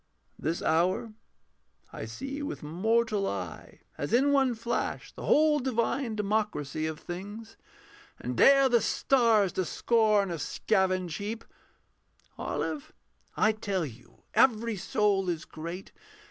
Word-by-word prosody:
This 165 +2 -2
hour 180 +7 +1 0.8
I - - -5
see 275 +2 -6
with 290 - -5
mortal 210 +6 +1
eye 90 -4 -6 0.2
as 145 +9 -3
in 270 +4 +4
one 270 -3 +3
flash 235 +2 -3
The - - -8
whole 305 0 +4
divine 245 -1 -1
democracy 200 -8 -1
of 160 -1 -5
things, 205 +5 -8 0.6
And 125 0 -4
dare 275 - +6
the 240 -3 +3
stars 230 -7 +3
to 185 - -1
scorn 215 +1 +2
a 165 - -4
scavenge 185 -1 0
heap. 220 +3 -5 0.9
Olive, 305 +1 -4 0.4
I 215 - +4
tell 200 -5 -2
you 120 -3 -13
every 230 -3 +3
soul 195 -1 +1
is 170 -2 -3
great. 170 +4 -7
215 Hz, 125 wpm, -29 LUFS, 175-235 Hz, 0.9 s, dare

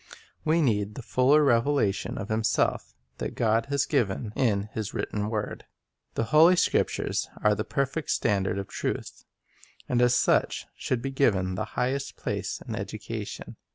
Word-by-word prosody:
We 160 +1 +3
need 105 -5 0
the 130 - -7
fuller 135 +6 +4
revelation 120 -5 +1
of 100 - -5
Himself 110 0 0 0.2
that - - -4
God 115 0 +1
has 140 0 +1
given 110 -6 -1
in 105 -7 +2
His 110 -2 -4
written 105 0 -2
word. 110 -2 -4 0.5
The - - +1
Holy 165 +4 +7
Scriptures - - 0
are 105 0 +5
the 105 - -2
perfect 140 +2 -2
standard 95 -1 +1
of 100 - -4
truth, - - -4 0.6
and 125 -1 +1
as 125 0 +4
such - - +2
should 125 -2 -2
be 135 - -2
given 100 -9 +2
the 95 +3 -2
highest 135 +2 -1
place - - -3
in - - -3
education. - - -6
115 Hz, 155 wpm, -27 LUFS, 105-140 Hz, 0.6 s, Holy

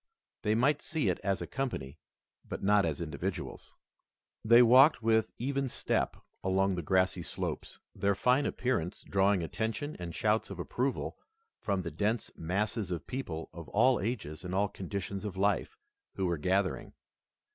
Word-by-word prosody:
They 105 -1 +1
might 140 +6 +3
see 155 - 0
it 90 - 0
as 100 -1 -1
a - - -4
company, 80 - -4 0.4
but - - -6
not 100 -1 +4
as 80 0 -3
individuals. 80 -3 -5 0.7
They 115 +2 +8
walked 130 +2 +7
with 110 -1 +3
even 135 +2 -1
step - - -1 0.3
along 95 +1 +2
the 90 - -2
grassy 95 +2 +2
slopes, - - -4 0.2
their 100 0 +1
fine 125 +7 +3
appearance 125 -10 -1
drawing 95 -1 +2
attention 115 - -3
and 85 -1 -6
shouts 110 +1 +1
of - - -7
approval 130 +2 -2 0.4
from 100 -3 -1
the 85 - -4
dense 105 +8 -1
masses 100 +5 -1
of 85 -4 -4
people 90 -12 -5
of 85 -1 -9
all 125 +4 +4
ages 95 -7 -4
and 90 0 -4
all 100 +1 +2
conditions 100 +1 -5
of 100 -3 -5
life 100 0 +1 0.4
who 95 - -1
were 85 -3 0
gathering. 95 +4 0
100 Hz, 155 wpm, -31 LUFS, 90-115 Hz, 0.7 s, They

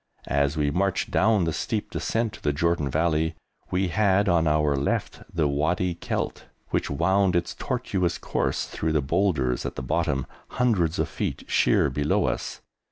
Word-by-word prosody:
As 70 +2 +1
we 75 -1 +1
marched 95 +4 0
down 105 -2 +3
the 80 -1 0
steep 95 +6 -2
descent 115 -2 -1
to - - -11
the 75 - +1
Jordan 85 -1 0
Valley 80 +1 +1 0.3
we 95 0 0
had 100 +1 +3
on 85 -3 +3
our 75 -1 +2
left 70 +1 -1
the 80 -3 +1
Wadi 80 +6 0
Kelt, 85 - -3 0.2
which - - -1
wound 95 -1 +2
its 85 0 0
tortuous 100 -9 -1
course - - -1
through 80 0 -2
the 75 - +2
boulders 75 -6 +1
at - - -4
the 65 - -5
bottom, 65 +1 0 0.3
hundreds 95 -10 +2
of - - +1
feet - - -4
sheer 70 - +3
below 75 +3 +1
us. - - -3
85 Hz, 165 wpm, -25 LUFS, 75-95 Hz, 0.3 s, down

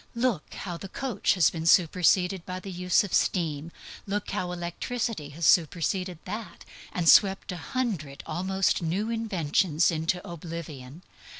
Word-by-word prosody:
Look 235 -9 -1
how 175 -3 -5
the 195 - -8
coach 260 0 0
has 180 - +4
been 165 -1 -4
superseded 180 +1 +4
by 185 +1 -5
the 195 +1 -8
use 180 +1 +2
of 200 - -6
steam. 160 -3 0 0.4
Look 200 0 -2
how 180 -1 -2
electricity 175 0 -3
has 170 - -1
superseded 175 +3 +2
that, 210 0 -7 0.3
and 175 -2 -2
swept 195 +2 +5
a 180 - -5
hundred 175 - -3
almost 190 +3 0
new 190 +7 -1
inventions 180 -7 +1
into 165 +3 -2
oblivion. 165 -3 -8
180 Hz, 140 wpm, -27 LUFS, 165-195 Hz, 0.4 s, swept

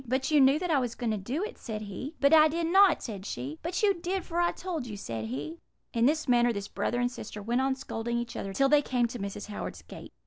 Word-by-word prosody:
"'But 260 +4 0
you 300 -2 +6
knew 270 +2 +6
that 355 +1 -2
I 290 - +4
was 245 -3 -2
going 235 -2 -2
to 215 - -1
do 250 - -3
it,' 445 +3 -6
said 215 -2 -5
he. 235 - -7
"'But 280 +2 +4
I 310 -1 +8
did 335 +2 -1
not,' 380 +1 +5
said 205 -5 -6
she. 145 -4 -5
"'But 355 +4 -3
you 405 -1 +5
did, 360 +1 -3
for 340 0 -2
I 345 - +3
told 335 -8 -5
you,' 210 -3 -6
said 115 - -5
he. 145 +8 -5 0.3
"In 230 +1 +3
this 310 +1 +1
manner 240 -1 +4
this 200 -3 -4
brother 245 - -2
and 245 0 +1
sister 215 -3 -8
went 235 +5 0
on 265 0 +1
scolding 235 -3 -3
each 235 -1 -4
other 195 - -4
till 275 +7 +3
they 295 +1 +5
came 250 -4 +1
to 245 - -6
Mrs. 200 +1 -5
Howard's 205 - -6
gate. - - -11
250 Hz, 270 wpm, -29 LUFS, 215-315 Hz, 0.3 s, I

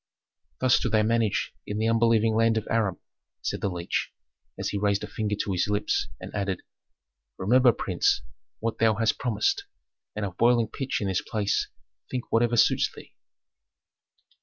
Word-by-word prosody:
"Thus 130 -1 +4
do 125 - -1
they 110 0 +3
manage 115 -2 +1
in 105 - -3
the 110 +1 +1
unbelieving 115 -1 +3
land 115 0 +3
of 110 - -2
Aram," 105 -6 +1 0.5
said - - -2
the 100 - 0
leech, 90 -1 -2 0.5
as - - -2
he 100 - -2
raised 100 -1 +1
a - - -4
finger 105 -1 -2
to 100 - -2
his 90 0 +1
lips, 105 0 0
and - - -9
added, 100 -3 -2 0.7
"Remember, 125 +5 +5
prince, 90 - 0 0.3
what 115 0 -3
thou 110 -1 +4
hast 115 +1 +1
promised, 110 -4 0 0.5
and 105 -1 -2
of 90 -3 -7
boiling 120 -1 +4
pitch 135 -4 -3
in 100 - -1
this 95 -1 0
place 105 -3 -1 0.4
think 125 -2 -5
whatever 120 +1 +2
suits - - +4
thee." - - -14
110 Hz, 165 wpm, -26 LUFS, 100-115 Hz, 0.7 s, Remember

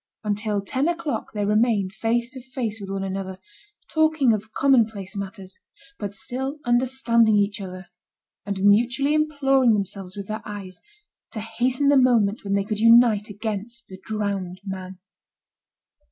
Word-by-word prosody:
Until 210 0 -1
ten 260 +9 -1
o'clock 335 -3 -2
they 205 -1 -2
remained 210 -2 +2
face 235 +2 -1
to 260 -1 -8
face 245 -4 -4
with 195 - -7
one 195 0 -3
another, 190 -1 -4 0.5
talking 315 -6 +3
of 215 +1 -4
commonplace 220 -8 +2
matters, 195 -1 -7 0.4
but 205 -2 -4
still 265 +7 -4
understanding 240 -2 +3
each 205 0 +1
other, 185 -1 -7 0.6
and 200 -2 -3
mutually 245 +8 +3
imploring 275 -5 +3
themselves 195 -1 -4
with 200 - -5
their 215 +2 -5
eyes, 200 -4 -8 0.5
to 220 - -4
hasten 245 +5 0
the 285 - +5
moment 235 -5 +3
when 200 -1 -2
they 200 0 +2
could 210 0 -3
unite 230 -2 +5
against 220 +2 -5
the 190 0 -10
drowned 200 -4 -3
man. 190 -1 -6
215 Hz, 145 wpm, -24 LUFS, 200-245 Hz, 0.6 s, the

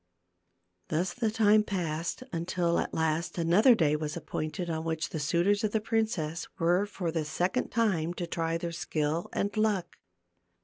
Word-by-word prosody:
Thus 175 +3 -1
the 230 -3 0
time 215 -1 +4
passed, 175 -1 -3
until 170 0 0
at - - -2
last 160 +2 -1
another 180 +9 +5
day 150 -6 +2
was 150 +1 -3
appointed 165 +2 -4
on 160 -1 -2
which 160 -2 -2
the 160 - -4
suitors 175 +7 +2
of 215 - 0
the 220 - +3
princess 210 -8 -1
were 175 +4 +2
for 180 -5 -3
the 160 -1 -1
second 180 +10 -1
time 175 -8 +1
to 175 - -3
try 165 -1 -1
their 170 0 -4
skill 160 0 -2
and 205 +2 -1
luck. 215 -4 0
170 Hz, 165 wpm, -29 LUFS, 160-205 Hz, -, another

